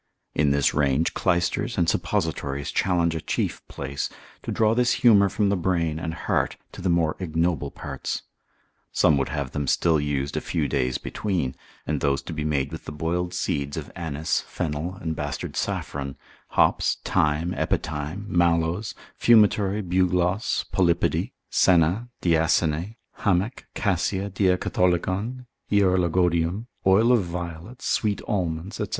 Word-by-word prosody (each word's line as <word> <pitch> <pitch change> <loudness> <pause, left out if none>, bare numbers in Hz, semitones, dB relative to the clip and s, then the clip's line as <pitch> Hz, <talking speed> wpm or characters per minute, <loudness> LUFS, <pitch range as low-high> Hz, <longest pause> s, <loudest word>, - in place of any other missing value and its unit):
In 75 -1 +2
this 70 0 +2
range, 70 +2 +2
clysters 90 -1 0
and 85 - +2
suppositories 75 -7 -1
challenge 85 -3 +1
a 80 - -3
chief - - -2
place, 70 0 -4 0.3
to - - -5
draw 110 -1 +3
this 120 +1 +3
humour 100 -4 +7
from 100 +1 +1
the 100 - +2
brain 85 -4 0
and 80 0 -4
heart, - - -1
to - - -9
the 95 - 0
more 85 -2 +2
ignoble 80 -4 0
parts. - - -5 0.7
Some 75 - +4
would 70 - -1
have 70 -3 -3
them 75 -1 -3
still 80 +2 +3
used 70 -1 -2
a - - -1
few - - -1
days 65 0 0
between, 90 -11 -2 0.3
and - - -1
those 70 -1 +1
to 85 - -6
be 80 -1 -3
made 70 -3 0
with 80 - -8
the - - -6
boiled 85 +4 -2
seeds 70 -4 -2
of - - -6
anise, 80 -2 -1
fennel, 85 +1 -4
and 80 -3 -4
bastard 75 -2 -4
saffron, 70 -1 -3 0.3
hops, - - +2
thyme, 75 +4 +1
epithyme, 75 +7 -2
mallows, 85 +3 +1 0.2
fumitory, 105 -3 +4
bugloss, 90 +2 +1
polypody, 85 -2 +1 0.2
senna, 90 +7 +3
diasene, 80 +3 +2 0.2
hamech, 100 +4 0
cassia, 100 -1 0
diacatholicon, 95 +5 0 0.3
hierologodium, 90 -1 +2 0.2
oil 110 +6 +5
of 120 -5 +4
violets, 85 +6 -6
sweet 105 -2 +1
almonds, 90 -2 -2
&c. - - -1
85 Hz, 140 wpm, -25 LUFS, 75-95 Hz, 0.7 s, humour